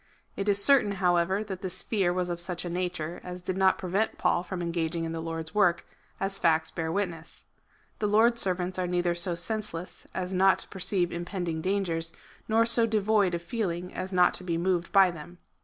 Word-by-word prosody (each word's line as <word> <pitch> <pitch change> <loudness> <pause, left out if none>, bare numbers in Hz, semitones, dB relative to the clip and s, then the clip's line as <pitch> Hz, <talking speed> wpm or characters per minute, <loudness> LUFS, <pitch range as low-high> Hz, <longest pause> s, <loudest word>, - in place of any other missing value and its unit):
It 200 +1 -2
is 200 0 +3
certain, 260 -7 +5
however, 185 +1 +1
that 190 -3 -6
this 185 -1 -4
fear 195 -6 +1
was 180 0 -1
of 170 0 -3
such 180 0 -3
a 175 - -4
nature 175 -2 -3
as 180 0 -6
did 185 - -2
not 190 0 +3
prevent 195 +4 -1
Paul 175 - +2
from 185 0 -6
engaging 170 -1 -2
in 165 - -3
the 165 0 -4
Lord's 165 -1 -5
work, 180 -5 +3 0.3
as 195 0 -1
facts 160 -1 +2
bear 160 -1 -3
witness. 170 -4 -3 0.5
The 210 - +1
Lord's 230 +3 +4
servants 185 0 -1
are 180 - 0
neither 175 -1 +1
so 175 0 0
senseless 185 -1 -4
as 185 0 -4
not 190 +1 +4
to - - -5
perceive 185 -2 -1
impending 175 -2 -3
dangers, 170 -3 -1 0.3
nor 225 +1 +3
so 230 0 +5
devoid 210 -4 +2
of 170 - -5
feel 215 +2 -1
ing 175 +2 -5
as 185 +1 -4
not 180 -1 +4
to - - -3
be 170 -2 -1
moved 175 0 0
by 195 -2 +6
them. 170 +2 -11
180 Hz, 205 wpm, -28 LUFS, 170-195 Hz, 0.5 s, by